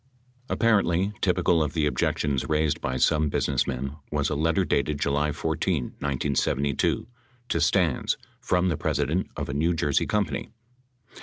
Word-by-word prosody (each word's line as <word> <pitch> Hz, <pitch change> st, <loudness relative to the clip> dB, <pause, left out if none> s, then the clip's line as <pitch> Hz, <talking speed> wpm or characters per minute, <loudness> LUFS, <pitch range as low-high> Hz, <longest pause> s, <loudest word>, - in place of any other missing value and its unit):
Apparently 100 Hz, -4 st, +2 dB
typical 90 Hz, -3 st, +2 dB
of 75 Hz, -3 st, -1 dB
the 80 Hz, -3 st, +1 dB
objections 70 Hz, -2 st, 0 dB
raised 75 Hz, -1 st, +1 dB
by 65 Hz, 0 st, -2 dB
some 75 Hz, +4 st, +2 dB
businessmen 70 Hz, +1 st, -1 dB
was 75 Hz, -1 st, 0 dB
a -, -, 0 dB
letter 80 Hz, +5 st, +1 dB
dated 70 Hz, -1 st, 0 dB
July 75 Hz, +1 st, +1 dB
14, 80 Hz, 0 st, -1 dB, 0.2 s
1972, 70 Hz, 0 st, 0 dB, 0.4 s
to 85 Hz, -, 0 dB
Stans 85 Hz, -3 st, +2 dB, 0.2 s
from 90 Hz, +1 st, +1 dB
the 80 Hz, -, -1 dB
president 75 Hz, +6 st, -1 dB
of -, -, -3 dB
a 70 Hz, -, -4 dB
New 80 Hz, +5 st, +1 dB
Jersey 75 Hz, -3 st, +1 dB
company. 105 Hz, -6 st, -1 dB
75 Hz, 140 wpm, -26 LUFS, 70-85 Hz, 0.4 s, Apparently